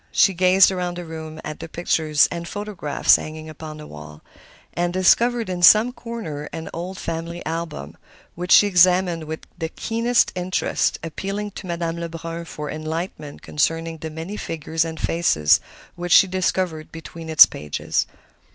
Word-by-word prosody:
She 195 - +4
gazed 185 +2 +5
around 180 -1 -3
the 175 - -6
room 160 -1 -8
at 155 0 -6
the 165 - -8
pictures 160 -3 +2
and 170 0 -5
photographs 205 -8 +1
hanging 155 0 -8
upon 155 0 -9
the 150 - -10
wall, 75 - -11 0.5
and 175 0 -1
discovered 230 +6 +3
in 180 -1 -4
some 215 +7 +7
corner 220 - -6
an 160 - -7
old 180 +3 -5
family 170 0 -5
album, 160 - -5 0.4
which 175 +1 -5
she - - +8
examined 180 -3 +3
with 160 +1 -6 0.2
the 160 -1 -2
keenest 230 +6 +1
interest, 185 0 -1
appealing 195 +6 -4
to 185 - -9
Madame 170 -1 -3
Lebrun 165 0 -6
for 150 -2 -6
enlightenment 155 -1 -5
concerning 165 +2 -1
the 160 - -5
many 165 +6 -7
figures 160 -2 -2
and 160 -1 -6
faces 80 - +3 0.3
which 175 0 -1
she - - +8
discovered 185 -3 -2
between 165 0 -9
its 160 -2 +10
pages. 75 -1 -3
170 Hz, 155 wpm, -22 LUFS, 160-185 Hz, 0.5 s, its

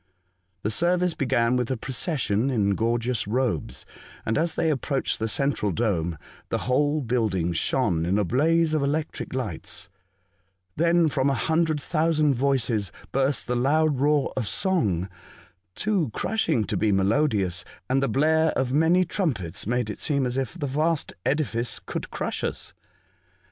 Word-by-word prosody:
The 105 - 0
service 175 +5 +2
began 125 -4 +1
with 125 -2 -1
a 130 - -1
procession 130 - 0
in 105 -6 +1
gorgeous 115 +1 0
robes, 125 +1 -2 0.4
and 110 - 0
as 165 +1 +1
they 160 - +1
approached 135 -1 -1
the 110 - -1
central 125 -3 0
dome, 85 -6 -1 0.3
the - - 0
whole 145 +4 +2
building 110 -9 0
shone 80 0 +1
in 90 +4 +1
a 105 - +2
blaze 155 - +2
of 155 - +1
electric 145 -1 -2
lights; 110 -11 -5 0.8
then 170 +1 +3
from 140 -2 +1
a 135 - +1
hundred 160 +4 +1
thousand 155 -1 +1
voices 120 -7 0 0.2
burst 135 +2 +1
the 125 - -1
loud 145 +3 +2
roar 145 0 +2
of 125 -5 -2
song 105 - +1 0.7
(too 195 - 0
crushing 165 - 0
to - - -3
be 110 - +2
melodious), 95 - +1 0.2
and 135 +1 +1
the 135 - +1
blare 160 +3 +3
of 130 -1 -1
many 165 +5 +4
trumpets 110 - -2
made 125 0 0
it 105 - -6
seem 140 -3 +1
as 125 0 -2
if 135 +6 -3
the 150 - -3
vast 155 +3 0
edifice 130 -5 0
could - - -6
crush - - -3
us. - - -4
135 Hz, 155 wpm, -25 LUFS, 110-155 Hz, 0.8 s, many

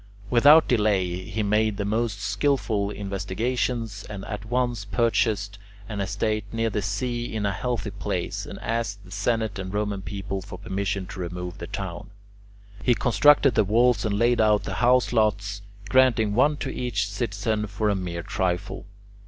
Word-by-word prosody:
Without 145 +6 +7
delay 95 -6 +1
he 110 0 -2
made 105 0 +1
the 100 - -2
most 110 0 -1
skilful 110 -5 0
investigations, 105 +3 -2
and 100 -2 -6
at 105 -1 -6
once 120 -2 -1
purchased 105 -2 0 0.3
an 105 -1 -4
estate 105 +2 -1
near 115 0 0
the 105 - -1
sea 120 +5 -2
in 110 -2 -2
a 100 - +1
healthy 115 +1 -3
place, 100 -3 -3
and - - -7
asked 105 -3 -3
the 95 - -14
Senate 110 0 -1
and 95 -1 -5
Roman 105 -1 -2
people 95 0 -4
for 95 -1 -9
permission 100 0 -2
to 95 - -9
remove 90 0 -5
the 85 - -6
town. 95 -4 -6 0.7
He 125 - +3
constructed 130 +4 +5
the 110 - +4
walls 115 +4 +3
and 105 -3 0
laid 120 +1 +3
out 105 -1 +3
the 100 - -4
house 125 0 +4
lots, 105 -2 +1 0.3
granting 115 -3 +4
one 145 +6 +3
to - - -4
each 110 -6 -1
citizen 105 0 -2
for 105 +2 -2
a 105 - +2
mere 85 -3 -4
trifle. 90 +1 -2
105 Hz, 165 wpm, -25 LUFS, 100-115 Hz, 0.7 s, Without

